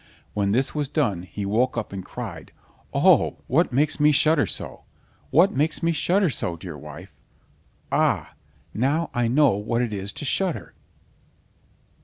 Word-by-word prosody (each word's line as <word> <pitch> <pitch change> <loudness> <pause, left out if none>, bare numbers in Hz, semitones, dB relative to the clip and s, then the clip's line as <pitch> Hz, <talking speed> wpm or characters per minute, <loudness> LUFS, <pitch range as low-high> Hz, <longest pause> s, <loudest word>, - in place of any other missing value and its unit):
When 100 -1 0
this 130 +5 0
was 150 -3 -2
done, 120 - 0
he 90 +3 -6
woke 120 +5 +1
up 110 -3 -4
and 95 -1 -5
cried: 95 -8 -8 0.4
"Oh, - - +4
what 155 +6 +2
makes 145 +5 +1
me 150 +1 +5
shudder 150 +1 +3
so?—what 180 +6 -1
makes 150 +5 0
me 165 - +3
shudder 180 +2 +1
so, 90 -7 -2
dear 85 -1 -8
wife? 75 +5 -11 0.8
Ah! - - +1 0.4
now 145 +8 0
I 120 -1 +1
know 140 +3 +4
what 110 +4 -1
it 115 -3 -3
is 100 0 -4
to - - -6
shudder!" 185 +4 -1
125 Hz, 150 wpm, -24 LUFS, 100-150 Hz, 0.8 s, me